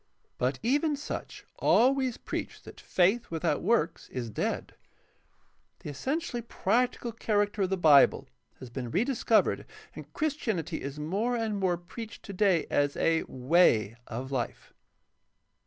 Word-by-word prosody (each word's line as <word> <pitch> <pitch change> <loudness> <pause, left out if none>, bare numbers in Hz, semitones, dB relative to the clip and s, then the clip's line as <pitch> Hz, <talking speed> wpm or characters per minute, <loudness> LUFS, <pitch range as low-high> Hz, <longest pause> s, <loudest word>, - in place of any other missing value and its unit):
But 130 +2 0
even 290 +5 +2
such 290 - -7
always 260 0 +3
preach - - -5
that - - -12
faith 195 +6 +2
without 160 -2 -1
works 190 -5 0
is 120 -3 -5
dead. - - -3 1.1
The 150 - -6
essentially 265 - -3
practical 235 +2 0
character 205 -2 0
of 190 - +1
the 190 - 0
Bible 150 -5 +5 0.3
has 125 -2 -10
been 125 -1 -5
rediscovered 225 - +2 0.3
and - - -10
Christianity 220 - -2
is 140 +1 -6
more 200 +11 -1
and 225 -3 -1
more 180 -2 +1
preached 215 +6 -9
today 195 -4 +1
as 145 0 +1
a 165 0 +2
''Way" 125 - +3
of 125 +3 -5
life. 125 -4 -4
190 Hz, 130 wpm, -29 LUFS, 145-235 Hz, 1.1 s, Bible